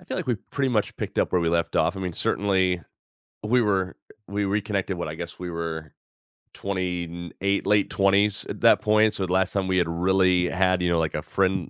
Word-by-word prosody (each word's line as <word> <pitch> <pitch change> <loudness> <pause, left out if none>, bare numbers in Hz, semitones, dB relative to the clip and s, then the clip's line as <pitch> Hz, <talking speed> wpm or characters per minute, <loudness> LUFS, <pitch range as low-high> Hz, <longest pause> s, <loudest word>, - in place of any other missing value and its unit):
I - - -18
feel - - -5
like 180 - -3
we 120 -3 0
pretty 135 -1 0
much 105 -3 -1
picked - - -5
up - - +1
where 90 - +3
we 85 - +1
left 85 -1 0
off. - - +2
I - - -5
mean, 90 -2 -3
certainly, 95 -2 +1 0.6
we 120 +3 +2
were 95 -4 0 0.3
we 100 +1 -2
reconnected 100 -2 -1
what 85 - -3
I 75 - -5
guess 85 +1 -8
we 90 -1 -5
were 80 -2 -5 0.6
20 90 -3 -3
n 85 0 -8
8, 100 +1 0
late 105 -1 +2
20s 100 +1 +3
at - - -5
that - - +5
point. 110 0 +3
So, 95 - -1
the 90 - -5
last 95 0 +1
time 95 -2 -1
we 95 0 +1
had 85 -2 +2
really 90 +1 +2
had, 95 0 +1
you 90 - +1
know, 85 - +2
like 80 -1 -1
a 75 - -2
friend 95 0 -1
95 Hz, 230 wpm, -25 LUFS, 85-100 Hz, 0.6 s, that